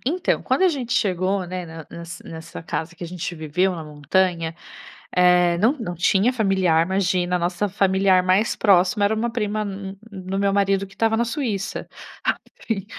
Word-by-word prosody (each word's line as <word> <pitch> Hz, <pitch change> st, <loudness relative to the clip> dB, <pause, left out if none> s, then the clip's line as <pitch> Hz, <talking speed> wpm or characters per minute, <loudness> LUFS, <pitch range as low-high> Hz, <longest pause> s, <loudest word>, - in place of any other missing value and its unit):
Então, 355 Hz, +7 st, 0 dB
quando -, -, +1 dB
a 375 Hz, -, +6 dB
gente 260 Hz, -8 st, -3 dB
chegou, 190 Hz, -5 st, +1 dB
né, 180 Hz, 0 st, -5 dB
ne 160 Hz, -1 st, -9 dB
ne 170 Hz, -, -8 dB, 0.3 s
nessa 160 Hz, 0 st, -8 dB
casa 165 Hz, 0 st, -4 dB
que 175 Hz, -, -7 dB
a -, -, -5 dB
gente 175 Hz, 0 st, -5 dB
viveu 170 Hz, +4 st, 0 dB
na 165 Hz, -2 st, -6 dB
montanha, 165 Hz, +3 st, 0 dB, 0.6 s
eh, 180 Hz, -1 st, +4 dB
não 220 Hz, +8 st, +4 dB
não 180 Hz, -7 st, -4 dB
tinha 195 Hz, +7 st, +3 dB
familiar, 190 Hz, -8 st, +2 dB
imagina, 185 Hz, -1 st, +1 dB
a -, -, 0 dB
nossa 175 Hz, +4 st, -1 dB
familiar 190 Hz, -1 st, +3 dB
mais 185 Hz, +5 st, +2 dB
próxima 200 Hz, +2 st, +3 dB
era 205 Hz, +2 st, +2 dB
uma 230 Hz, +2 st, -1 dB
prima 215 Hz, -2 st, -1 dB
m 195 Hz, -1 st, -5 dB
m 195 Hz, -, -12 dB
m 190 Hz, -2 st, -7 dB
do 195 Hz, -, -1 dB
meu 200 Hz, 0 st, +2 dB
marido 195 Hz, 0 st, +2 dB
que 195 Hz, -, -18 dB
estava 225 Hz, +2 st, +1 dB
na 235 Hz, -, +2 dB
Suíça. 230 Hz, -5 st, -3 dB, 0.4 s
Aí -, -, +2 dB, 0.3 s
e -, -, +4 dB
e 195 Hz, -, -6 dB
190 Hz, 200 wpm, -22 LUFS, 175-210 Hz, 0.6 s, a